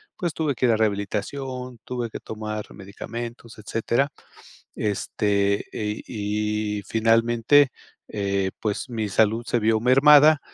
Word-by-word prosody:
pues 175 -3 -3
tuve 155 -3 0
que 125 - +1
ir 115 - +4
a 110 - +2
rehabilitación, 120 +5 -3
tuve 120 -2 -4
que - - -6
tomar 110 -1 -5
medicamentos, 115 +4 -8
etcétera, 115 +6 -1 0.7
este, 100 0 0
y 105 0 -2
y - - -6
finalmente, 115 +6 +3 0.4
eh, 100 -2 -1
pues, 110 +5 -3
mi 110 -3 -2
salud 110 +3 +2
se 120 - +1
vio 110 0 +2
mermada 145 +4 +6
110 Hz, 125 wpm, -24 LUFS, 105-125 Hz, 0.7 s, mermada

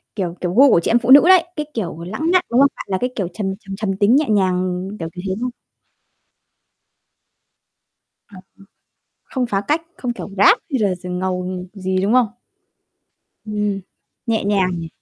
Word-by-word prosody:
kiểu, 180 -5 -3
kiểu 180 -1 -2
gu 270 +6 +6
của 175 - +5
chị - - 0
em 235 - +4
phụ 240 +2 +1
nữ 285 +2 +10
đấy. 370 -2 +7
Cái, 300 - -3
kiểu, 170 -7 -4
lãng 220 - -2
mạn, 365 -1 +3
đúng 240 - +3
không? 280 - +7
Bạn - - -8
là 190 - 0
cái 250 - 0
kiểu 195 -5 -2
trầm, 195 -2 -3
trầm 195 -2 -8
trầm 195 -2 -3
tính 205 +5 +4
nhẹ 305 +2 +3
nhàng, 185 -2 0
kiểu, 165 -1 -4
kiểu 180 - -8
thế 190 - -1
hông? 250 0 -2 2.8
À, 205 - -16
ờ, 185 - -11 0.8
không 255 -2 -2
phá 200 -4 -1
cách, 310 +3 +1
không 245 -2 -3
kiểu 240 - -8
rap 200 - +6
hay 265 - +1
là 200 -3 +1
d 180 +1 -12
ngầu 180 0 -2 0.3
gì, 190 -2 -2
đúng 200 +3 +1
không? 250 -1 +4 1.2
Ừm. 210 -2 -2 0.5
Nhẹ 225 -1 0
nhàng 200 -2 +1
nhỉ? 165 - -6
205 Hz, 190 wpm, -19 LUFS, 185-245 Hz, 2.8 s, nữ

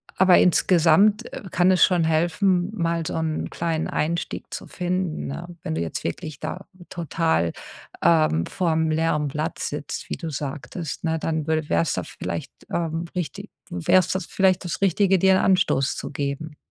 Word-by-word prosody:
Aber 185 -1 +6
insgesamt, 180 +5 +4
äh, - - -7
kann 175 +1 +3
es 185 - +5
schon 180 -3 +1
helfen, 175 +4 +2
mal 170 -4 -1
so - - -3
'n 160 -1 -2
kleinen 165 -1 -2
Einstieg 165 +2 -2
zu - - -6
finden, 180 -2 -2
ne? 165 +5 -6 0.2
Wenn 80 - -3
du 80 - -1
jetzt 85 - -4
wirklich 140 - -5
da 185 - -5 0.2
total, 160 - 0 0.5
ähm, 155 - +3
vorm 160 -3 0
leeren 155 -1 +1
Blatt 155 +4 -3
sitzt, 145 0 -5
wie - - -2
du 165 - -5
sagtest, 145 +2 -5
ne? 160 -1 0
Dann 160 -1 -2
würde 160 -1 0
wär's 85 0 +2
da - - -2
vielleicht - - -5 0.6
richtig 155 -6 -4 0.2
wär's 160 - +3
das 190 -2 -1
vielleicht 190 0 +2
das 170 -1 -4
Richtige, 195 0 +3
dir 190 +1 +5
'n - - +3
Anstoß 180 -8 +2
zu - - -5
geben. 145 +2 -4
165 Hz, 165 wpm, -24 LUFS, 150-180 Hz, 0.6 s, Aber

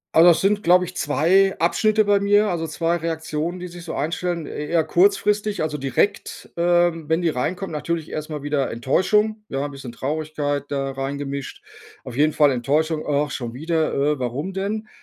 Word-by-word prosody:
Also, 165 +2 +8
das 170 - +5
sind, 205 +1 +2
glaube 180 +1 +5
ich, 180 +1 -7
2 185 +7 +3
Abschnitte 215 +6 +3
bei 205 -1 +3
mir. 205 +1 +3
Also, 165 -4 -2
2 165 +2 0
Reaktionen, 160 +1 -3
die 180 - -6
sich 175 0 -10
so - - -5
einstellen, 170 +2 -2
eh 150 - -5
eher 165 0 +2
kurzfristig. 210 - +2
Also, 150 -1 -2
direkt, 135 +9 -1
ähm, 175 -2 +2
wenn 160 +2 +1
die 170 - +2
reinkommen. 175 +7 -3
Natürlich 160 +1 -3
erst 155 0 -5
mal 150 -2 -5
wieder 145 -2 0
Enttäuschung. 210 - +1
Ja, 135 -5 -3
'n 145 - -5
bisschen 135 -4 -9
Traurigkeit 145 0 -2
da 135 -1 -2
reingemischt. 140 0 -5 0.4
Auf 125 0 -8
jeden 150 +1 +3
Fall 145 -2 +4
Enttäuschung. 155 +6 0
„Ach, 145 0 0
schon 120 -3 -5
wieder. 160 +4 -1
Äh, 145 +1 +1
warum 130 +9 -3
denn?“ 205 +3 -3
160 Hz, 185 wpm, -22 LUFS, 145-180 Hz, 0.4 s, Also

